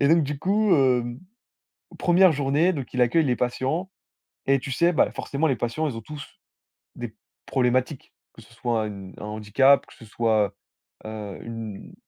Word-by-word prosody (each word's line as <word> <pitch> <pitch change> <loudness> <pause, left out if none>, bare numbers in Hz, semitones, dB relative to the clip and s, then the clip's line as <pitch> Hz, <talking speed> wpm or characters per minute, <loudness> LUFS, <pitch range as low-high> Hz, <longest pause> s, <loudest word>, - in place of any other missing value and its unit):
et 140 - +4
donc 165 +1 +5
du 145 0 -3
coup, 205 +3 +3
hem, 125 -4 +2 0.8
1re 180 0 +5
journée, 145 +5 +2
donc 140 -6 -6
il 125 - +1
accueille 150 +7 +3
les 125 -3 +2
patients 135 +9 -1 0.6
et 135 0 +4
tu 135 - -6
sais, 170 +6 +3
bah, - - +3
forcément, 145 +3 -1
les 135 - +2
patients, 120 +8 -1
ils 120 - -6
ont - - -6
tous 145 +5 -8 0.7
des - - -6 0.3
problématiques, 130 +2 0 0.2
que 115 - -14
ce 115 - -19
soit 115 -2 -1
une 100 -3 -8
un - - -8
handicap, 110 +6 +3
que - - -17
ce - - -14
soit, 105 -2 +1 0.5
heu, 105 -3 -6
une 115 -3 -7
130 Hz, 175 wpm, -25 LUFS, 115-150 Hz, 0.8 s, donc